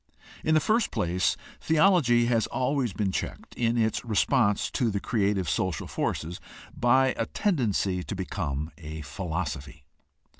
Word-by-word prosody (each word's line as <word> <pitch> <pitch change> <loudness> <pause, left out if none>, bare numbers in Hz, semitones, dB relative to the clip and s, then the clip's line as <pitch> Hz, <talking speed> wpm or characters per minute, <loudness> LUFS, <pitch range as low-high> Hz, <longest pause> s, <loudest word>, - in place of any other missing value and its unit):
— - - -20
In 155 - +3
the - - +6
first 220 +9 +2
place, 90 +2 0 0.2
theology 155 -8 +4
has 115 -2 +2
always 130 -1 0
been 95 0 -1
checked - - -5
in 120 0 0
its 110 -1 +1
response 110 -1 +2
to 120 - +1
the 100 -1 -1
creative 100 -4 0
social 90 -6 -1
forces 85 +3 -3 0.4
by 130 +2 +4
a 115 - 0
tendency 105 - 0
to - - -4
become 80 -5 -3
a 80 0 -7
philosophy. 75 -5 -5
105 Hz, 145 wpm, -27 LUFS, 90-125 Hz, 0.4 s, the